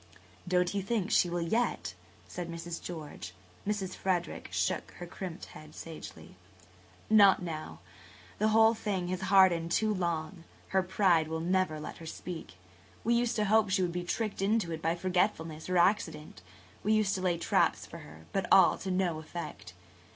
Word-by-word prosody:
"Don't 180 0 +2
you 200 - 0
think 205 0 -1
she 175 - +4
will 175 0 -1
yet?" 230 +8 -1 0.3
said 175 -1 -6
Mrs. 170 0 -6
George. 150 - -8 0.3
Mrs. 200 -3 -2
Frederick 175 -3 -2
shook - - -1
her 175 - -7
crimped 175 -1 -7
head 155 0 -12
sagely. 95 - -10 0.7
"Not 200 -4 +6
now. 155 - -6 0.6
The 215 - +3
whole 220 +1 +5
thing 200 -5 -3
has 185 0 -2
hardened 185 -3 +4
too 215 +4 +2
long. 170 -1 -3 0.3
Her 190 - +3
pride 180 -3 +2
will 160 0 -3
never 175 -2 0
let 150 - -7
her 165 - -10
speak. 160 - -7 0.5
We 235 - +2
used 240 0 +1
to 215 - +1
hope 215 0 +3
she 190 0 +2
would 175 - 0
be 175 +1 -3
tricked 210 +3 -2
into 205 -3 +1
it 160 -1 -4
by 165 +1 +1
forgetfulness 175 -3 -1
or 185 - +2
accident–we 150 - -1
used 215 -2 +3
to 185 - -2
lay 180 -2 +1
traps - - +1
for - - -10
her–but 80 - -5
all 190 -3 +6
to 190 - -5
no 180 -3 0
effect. 155 - -8
180 Hz, 165 wpm, -30 LUFS, 160-195 Hz, 0.7 s, Not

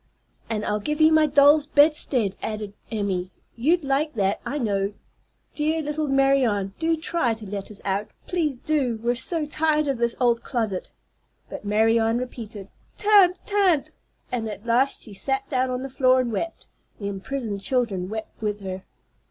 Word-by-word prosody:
"And 215 -2 -2
I'll 210 0 0
give 300 +9 -3
you 315 0 +6
my 315 -1 +5
doll's 290 +1 +5
bedstead," 285 -9 +3
added 210 -2 -4 0.2
Emmy. 195 -4 -2 0.3
"You'd 320 +8 +2
like 280 +2 0
that, 195 -2 0
I 290 - -3
know. 200 -5 -1 0.6
Dear 315 +1 0
little 300 +1 -2
Marianne, 270 -8 +2
do 325 0 +2
try 315 -7 0
to 220 -1 -10
let 200 0 -5
us 210 - -10
out. 200 +2 -1 0.2
Please 315 -7 -1
do. 255 -5 0
We're 240 +1 +2
so 310 +6 -1
tired 305 0 +1
of 270 -4 -1
this 235 0 0
old 240 -2 +2
closet." 220 -7 -2 0.6
But - - -6
still 205 - -7
Marianne 225 +2 +3
repeated, 225 -5 -7 0.3
"Tan't, 400 -4 +5
tan't." 390 -8 +2 0.4
And 225 -3 -2
at 210 +1 -8
last 245 +4 +2
she 215 - -8
sat 270 +7 -1
down 260 -1 +1
on 255 0 -3
the - - -3
floor 255 -1 +3
and 245 -2 -1
wept. 330 +11 -4 0.3
The 200 - -4
imprisoned 200 +1 -4
children 200 -5 0
wept 220 +1 -7
with 210 -1 -2
her. 190 -1 -5
245 Hz, 170 wpm, -24 LUFS, 210-295 Hz, 0.6 s, you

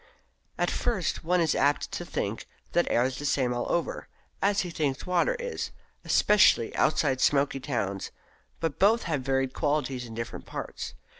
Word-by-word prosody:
At - - +1
first 220 -8 -1
one 180 +2 +2
is 165 -2 +2
apt 145 +1 +1
to - - -4
think - - -3 0.2
that 175 - +2
air 120 - +3
is 130 0 -2
the - - -6
same 130 -3 +1
all 120 - -2
over, 170 - -1 0.3
as 200 0 +3
he 180 - -4
thinks 145 -4 -2
water 180 - +2
is 485 0 -3 0.3
especially 205 - +4
outside 130 -4 +2
smoky 140 -1 +2
towns; 105 -8 -2 0.5
but 165 -4 -2
both 220 +4 +4
have 150 -5 -1
varied 135 0 0
qualities 145 -5 -1
in 115 - -9
different 115 +1 -6
parts. - - -6
145 Hz, 165 wpm, -28 LUFS, 130-175 Hz, 0.5 s, especially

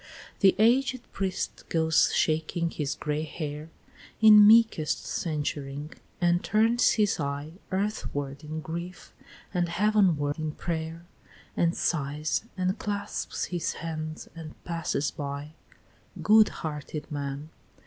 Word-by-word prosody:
V. 195 - +7
The - - +1
aged 255 +3 +3
priest 190 -1 -3
goes 160 -1 +3
shaking 160 +2 0
his 150 -2 -3
gray 150 0 -2
hair 155 0 -5 0.5
In 210 -1 +9
meekest 220 -8 +4
censuring, 145 -2 -3 0.3
and 175 0 +2
turns 225 +3 +3
his 210 -5 +1
eye 145 +4 -4
Earthward 155 -8 -3
in 155 +1 -5
grief, 170 +3 -7 0.4
and 175 -2 0
heavenward 175 -6 +2
in 155 -1 -3
pray'r, 165 0 -4 0.5
And 170 0 +1
sighs, 150 +3 -1
and 185 +1 0
clasps 205 -1 -3
his 175 -3 -1
hands, 155 -1 -5
and 160 -2 -9
passes 165 -4 -2
by, 145 0 -6 0.7
Good 215 0 +6
hearted 150 -1 -6
man! 145 +1 -4
160 Hz, 120 wpm, -27 LUFS, 150-190 Hz, 0.7 s, In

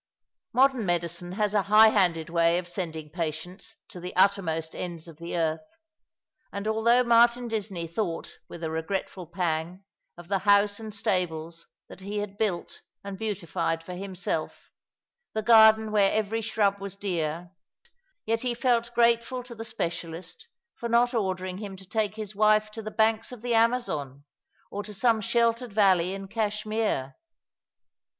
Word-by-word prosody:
Modern 260 -2 +3
medicine 175 0 -2
has 210 0 0
a 205 - +3
high 215 +3 +7
handed 175 -6 +1
way 170 0 +3
of 180 -1 -3
sending 160 -4 -5
patients 165 +2 -5
to 185 - -9
the 180 +1 -7
uttermost 170 -4 +2
ends 175 -2 -6
of 165 -2 -13
the 170 +1 -4
earth; 160 -1 0 0.9
and 200 +1 -4
although 230 +3 +3
Martin 235 +1 +4
Disney 200 -6 -3
[thought 170 0 -4
with 170 - -9
a 160 - -2
regretful 175 +2 -4
pang 170 +1 -2 0.3
of 175 -1 -12
the 195 +1 0
house 205 +1 +3
and 220 -1 -7
stables 170 -6 -2 0.2
that - - -12
he 200 +2 -5
had 205 -1 -5
built 190 -6 -2 0.2
and 200 -1 -6
beautified 170 -6 -2
for 180 - -7
himself, 180 -3 -4 0.6
the 220 - -2
garden 220 -1 +6
where 200 -2 +4
every 220 +1 0
shrub 205 -2 +1
was 200 0 -7
dear, 175 -3 -3 0.7
yet 225 +1 +1
he 245 -2 -1
felt 235 -1 +1
grateful 235 +2 +2
to 245 -1 -10
the 225 -1 -7
specialist 175 - -5 0.3
for 235 - -5
not 240 +2 +3
ordering 185 -4 -2
him 200 -2 -6
to 190 0 -13
take 210 +1 -1
his 215 -2 -6
wife 215 +1 +3
to 225 - -7
the 215 - -5
banks 220 +1 +1
of 245 -3 -10
the 245 -1 0
Amazon 225 - 0 0.5
or 205 - -3
to 210 0 -8
some 225 +1 +2
sheltered 235 +1 +1
valley 190 -3 +3
in 195 0 -7
Cash 210 0 -2
mere. 215 -11 -1
200 Hz, 160 wpm, -27 LUFS, 175-220 Hz, 0.9 s, high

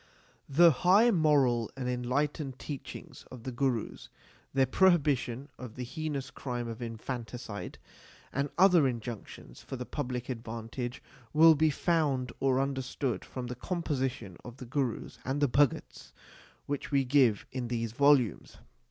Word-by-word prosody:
The 165 +4 +7
high 195 - +5
moral 140 - +3
and 130 -2 -3
enlightened 130 +2 -1
teachings 140 0 -8
of 125 -3 -10
the 130 - -4
Gurus, 120 -2 -2 0.4
their 135 0 +3
prohibition 140 -5 +2
of 125 -3 -8
the 125 - -5
heinous 140 -1 -4
crime 125 -2 -4
of 115 +1 -7
infanticide, 115 -1 -6 0.6
and 140 +1 -1
other 180 -6 +6
injunctions 115 - -7
for - - -7
the 125 -1 -5
public 125 -4 -4
advantage 115 +1 -5 0.3
will 160 +1 +8
be 155 +1 +3
found 145 -5 0
or 135 -1 +2
understood 135 -1 -2
from 130 -1 -6
the 125 - -4
composition 130 - -3
of 120 0 -10
the 130 - -8
Gurus 130 -1 -3
and 135 +2 -2
the 145 - +3
Bhagats 140 +1 0 0.5
which 145 -1 -3
we 140 -2 +2
give 125 -5 +3
in 125 -2 -3
these 115 -2 -2
volumes. 135 -3 +2
130 Hz, 140 wpm, -30 LUFS, 120-145 Hz, 0.6 s, will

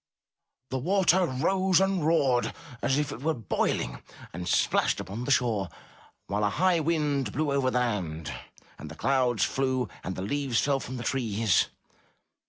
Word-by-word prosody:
The 130 - -1
water 185 +3 +3
rose 185 +7 +2
and 195 -3 +1
roared 140 -6 +2 0.3
as 135 - +2
though 145 -1 -1
it - - -14
were 160 +2 0
boiling, 115 -6 -1 0.3
and 90 +2 -5
splashed - - +2
upon 110 +6 -5
the - - -4
shore, 110 -8 +1 0.6
while 105 +1 -1
a 105 - +3
high 180 - +2
wind 150 -7 0
blew 150 +3 -1
over 140 -2 +2
the 125 - 0
land, 90 -11 -2 0.5
and 80 - -8
the 80 - -9
clouds 125 - +1
flew 130 -4 0
and 95 - -4
the 95 - -4
leaves 135 +2 0
fell 140 -1 +1
from 130 -1 -6
the 120 - -5
trees. 115 -5 +1
130 Hz, 165 wpm, -28 LUFS, 110-150 Hz, 0.6 s, water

